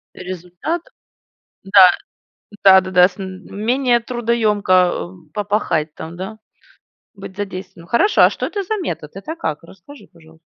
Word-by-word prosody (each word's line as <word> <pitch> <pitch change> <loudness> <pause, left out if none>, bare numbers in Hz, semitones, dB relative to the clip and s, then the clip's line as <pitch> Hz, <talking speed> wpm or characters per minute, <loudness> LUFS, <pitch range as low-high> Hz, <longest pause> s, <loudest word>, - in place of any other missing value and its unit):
Результат, 180 - -5 0.8
да, 195 -2 +7 0.7
да-да-да, 185 -2 +6
с 185 - -19
менее 225 +7 -1
трудоёмко, 230 -4 0
эм, 180 -2 +1
попахать 200 -7 -1
там, 165 +2 -9
да, 205 +4 -7 0.8
быть 195 -2 -11
задействованным. 190 -3 -7
Хорошо, 395 - +3
а - - +7
что - - -4
это 405 -2 -3
за 435 +4 -2
метод? 150 - -5
Это 200 - -6
как? 155 - -4
Расскажи, 195 +12 -15
пожалуйста. 160 -1 -20
190 Hz, 125 wpm, -19 LUFS, 180-225 Hz, 0.8 s, да